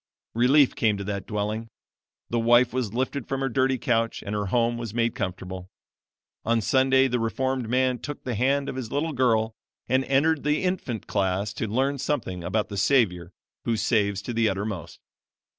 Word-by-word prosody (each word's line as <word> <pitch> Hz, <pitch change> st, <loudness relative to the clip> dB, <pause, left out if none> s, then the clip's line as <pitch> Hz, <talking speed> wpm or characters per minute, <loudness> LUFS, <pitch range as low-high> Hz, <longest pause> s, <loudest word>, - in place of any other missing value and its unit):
"Relief 130 Hz, +4 st, +4 dB
came 105 Hz, -3 st, +2 dB
to 100 Hz, -, -4 dB
that 100 Hz, -1 st, -4 dB
dwelling. 105 Hz, +1 st, -2 dB, 0.6 s
The 120 Hz, -, +1 dB
wife 120 Hz, +1 st, +4 dB
was 125 Hz, -5 st, -1 dB
lifted 130 Hz, +2 st, -2 dB
from 135 Hz, 0 st, -2 dB
her 135 Hz, -, 0 dB
dirty 130 Hz, +1 st, +1 dB
couch, 115 Hz, -1 st, 0 dB
and 100 Hz, -, -4 dB
her 105 Hz, -1 st, -1 dB
home 120 Hz, +3 st, +1 dB
was 115 Hz, -2 st, -6 dB
made 115 Hz, -1 st, +1 dB
comfortable. 95 Hz, 0 st, -5 dB, 0.7 s
On 115 Hz, 0 st, +2 dB
Sunday, 130 Hz, +3 st, +3 dB
the 125 Hz, -1 st, -1 dB
reformed 130 Hz, +1 st, -1 dB
man 130 Hz, 0 st, +1 dB
took 145 Hz, -1 st, -7 dB
the 125 Hz, -, -3 dB
hand 135 Hz, +5 st, +1 dB
of 130 Hz, -, -4 dB
his 120 Hz, -4 st, -5 dB
little 155 Hz, +3 st, -1 dB
girl 115 Hz, -4 st, +2 dB, 0.3 s
and 130 Hz, +2 st, +2 dB
entered 145 Hz, +3 st, +2 dB
the 150 Hz, +4 st, +1 dB
infant 180 Hz, -, -2 dB
class 100 Hz, +1 st, -1 dB
to 110 Hz, -, -3 dB
learn 135 Hz, +6 st, 0 dB
something 100 Hz, -12 st, -2 dB
about 105 Hz, +5 st, -1 dB
the 100 Hz, -, -5 dB
Savior 95 Hz, -7 st, +2 dB, 0.3 s
'who 115 Hz, -1 st, +1 dB
saves 100 Hz, -4 st, +1 dB
to 120 Hz, -, -4 dB
the 115 Hz, -1 st, +2 dB
uttermost.' 95 Hz, -4 st, -4 dB
115 Hz, 180 wpm, -25 LUFS, 105-130 Hz, 0.7 s, Relief